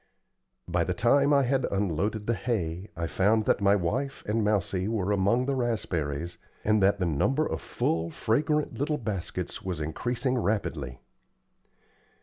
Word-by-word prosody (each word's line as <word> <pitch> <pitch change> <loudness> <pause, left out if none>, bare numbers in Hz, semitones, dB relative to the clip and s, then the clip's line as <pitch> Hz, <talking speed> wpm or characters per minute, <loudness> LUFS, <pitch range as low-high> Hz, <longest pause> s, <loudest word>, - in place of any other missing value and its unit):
By 85 -1 +1
the 90 +2 -2
time 140 +8 +4
I 140 -1 +5
had 130 0 +1
unloaded 100 +2 -1
the 115 - +1
hay, 95 -4 -2
I 85 - -1
found 105 +6 +2
that - - +2
my 100 0 +5
wife 130 +10 -2
and 110 +1 0
Mousie 100 -2 0
were 105 -3 0
among 105 +6 +2
the 140 - 0
raspberries, 85 - -2 0.2
and 105 -1 +3
that 95 +1 +4
the 90 - 0
number 130 - +1
of - - -3
full, 80 +1 -1
fragrant 145 - 0
little 150 +2 0
baskets 105 -8 -4
was 90 -4 -4
increasing 120 - -1
rapidly. 75 - -2
105 Hz, 150 wpm, -28 LUFS, 90-120 Hz, 0.2 s, I